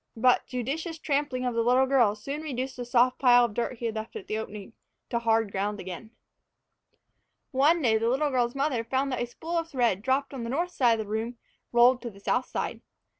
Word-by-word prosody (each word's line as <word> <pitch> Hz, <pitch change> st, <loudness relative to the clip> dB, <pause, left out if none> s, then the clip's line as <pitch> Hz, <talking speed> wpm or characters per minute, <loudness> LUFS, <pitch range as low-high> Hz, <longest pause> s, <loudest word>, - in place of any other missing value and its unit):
But 250 Hz, +2 st, +3 dB
judicious 295 Hz, +7 st, -3 dB
trampling 280 Hz, -4 st, -1 dB
by 250 Hz, -, 0 dB
the 230 Hz, 0 st, 0 dB
little 250 Hz, +3 st, +4 dB
girl 250 Hz, -6 st, +3 dB
soon 275 Hz, +8 st, -5 dB
reduced 265 Hz, -3 st, -4 dB
the 245 Hz, -, -5 dB
soft 245 Hz, +1 st, +3 dB
pile 245 Hz, -2 st, +6 dB
of 230 Hz, -, -5 dB
dirt 240 Hz, +3 st, -2 dB
he 235 Hz, -, -5 dB
had 225 Hz, -, -1 dB
left 220 Hz, -, -6 dB
at 425 Hz, -3 st, -6 dB
the -, -, -3 dB
opening 210 Hz, 0 st, -8 dB, 0.4 s
to 235 Hz, -, +1 dB
hard 225 Hz, -2 st, +1 dB
ground 205 Hz, +1 st, -2 dB
again. 185 Hz, +4 st, -7 dB, 1.4 s
One 295 Hz, +5 st, +3 dB
day 220 Hz, -3 st, +3 dB
the 230 Hz, +1 st, +1 dB
little 285 Hz, +4 st, +1 dB
girl's 245 Hz, -1 st, 0 dB
mother 275 Hz, -4 st, 0 dB
found 265 Hz, +4 st, -1 dB
that 255 Hz, -, -2 dB
a 240 Hz, -, -1 dB
spool 330 Hz, +7 st, -3 dB
of 330 Hz, 0 st, -5 dB
thread 240 Hz, -, +1 dB
dropped 270 Hz, +3 st, 0 dB
on 255 Hz, -3 st, -5 dB
the 230 Hz, -, -4 dB
north 340 Hz, +8 st, -1 dB
side 235 Hz, -7 st, +3 dB
of 220 Hz, -, -3 dB
the 205 Hz, -, -10 dB
room 225 Hz, +3 st, -3 dB, 0.3 s
rolled 245 Hz, +1 st, +5 dB
to 240 Hz, -, -5 dB
the 200 Hz, -3 st, -15 dB
south 250 Hz, +5 st, 0 dB
side. -, -, -4 dB
245 Hz, 225 wpm, -27 LUFS, 230-275 Hz, 1.4 s, pile